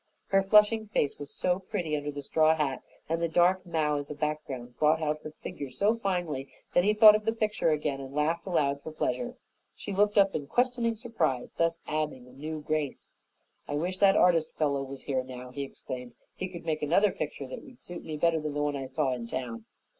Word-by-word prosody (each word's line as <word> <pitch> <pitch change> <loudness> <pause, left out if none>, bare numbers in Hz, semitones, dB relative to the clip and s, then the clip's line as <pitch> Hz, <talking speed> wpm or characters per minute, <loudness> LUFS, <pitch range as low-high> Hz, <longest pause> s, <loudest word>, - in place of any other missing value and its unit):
Her 195 0 +4
flushing 210 +2 +5
face 150 -9 0
was 145 -1 -7
so 180 0 0
pretty 185 -5 -2
under 145 0 -3
the 145 0 -7
straw 155 +2 +4
hat, 140 -4 -1 0.3
and 165 +1 -1
the 170 - +2
dark 180 +3 +3
mow 155 -3 +1
as 145 - -7
a 150 - -5
background 140 -5 -4
brought 155 +1 +4
out 155 -1 -1
her - - -6
figure 145 -2 -7
so 200 - +2
finely 175 - -2 0.2
that 175 - +4
he 205 - +4
thought 215 0 +10
of 215 - -1
the 225 - +1
picture 215 -6 0
again 150 -3 0
and 135 -1 -8
laughed 160 +5 0
aloud 140 -6 +1
for 160 - -7
pleasure. 245 +10 -2 0.4
She 200 - -6
looked 205 +2 +2
up 195 -1 +5
in 145 -2 -3
questioning 245 - +1
surprise, 220 - -1
thus 165 0 0
adding 150 -5 -2
a - - -15
new 155 +3 -5
grace. 155 -2 -2 0.6
"I 145 - -2
wish 180 +5 -2
that 200 0 +6
artist 165 -3 +3
fellow 140 -3 +1
was 135 -1 -7
here 130 -3 -1
now," 125 -1 -9
he 140 - -5
exclaimed. 125 -2 -7 0.2
"He 185 - -4
could 170 -2 -9
make 155 -2 -1
another 180 +7 +3
picture 145 -4 -4
that 130 - -7
would 255 -3 -15
suit 175 0 -8
me 155 -1 -5
better 165 +1 +2
than 150 -1 -4
the 145 - 0
one 145 -1 0
I 135 -1 -4
saw 135 0 0
in 120 -2 -5
town." 115 -3 -5
155 Hz, 220 wpm, -29 LUFS, 140-185 Hz, 0.6 s, thought